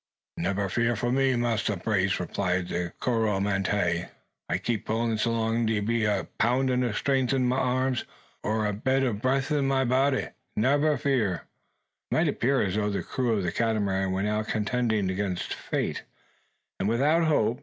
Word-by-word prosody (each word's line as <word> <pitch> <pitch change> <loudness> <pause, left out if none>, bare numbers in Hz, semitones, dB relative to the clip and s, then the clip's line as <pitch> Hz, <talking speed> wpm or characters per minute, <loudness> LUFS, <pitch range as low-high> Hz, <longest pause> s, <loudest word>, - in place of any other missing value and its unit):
"Nebba 100 +3 -1
fear 120 +4 +1
fo' 120 +3 -1
me, 135 0 +2
Massa 115 -4 0
Brace!" 100 +1 0
replied 90 0 -1
the 85 0 -2
Coromantee. 100 -6 0 0.4
"A - - +1
keep 115 -3 -3
pullin' 115 +1 0
so 115 +2 +1
long's 115 0 0
de 110 -1 +1
be 115 +2 0
a 100 -4 0
poun' 130 +3 +2
o' 120 - 0
trength 130 +3 +1
in 130 -2 +2
ma 125 +1 +1
arms, 130 -1 +1 0.4
or 110 +1 0
a 105 - 0
bit 130 +6 +1
o' 125 -4 +1
breff 130 +7 0
in 145 -2 +2
ma 135 -1 +2
body. 130 +2 +2 0.3
Nebba 145 +6 +3
fear!" 115 -11 0 0.7
It - - 0
might - - +3
appear 135 +1 +1
as 95 -3 -1
though 105 -1 +1
the 100 - -2
crew 125 -3 -1
of 100 -3 0
the 85 - -1
Catamaran 100 -4 0
were 95 +1 -1
now 105 +1 0
contending 110 -1 0
against 95 -1 -2
fate, - - -3 0.8
and 100 - 0
without 150 +8 +3
hope. 120 -7 +2
115 Hz, 175 wpm, -27 LUFS, 100-130 Hz, 0.8 s, Nebba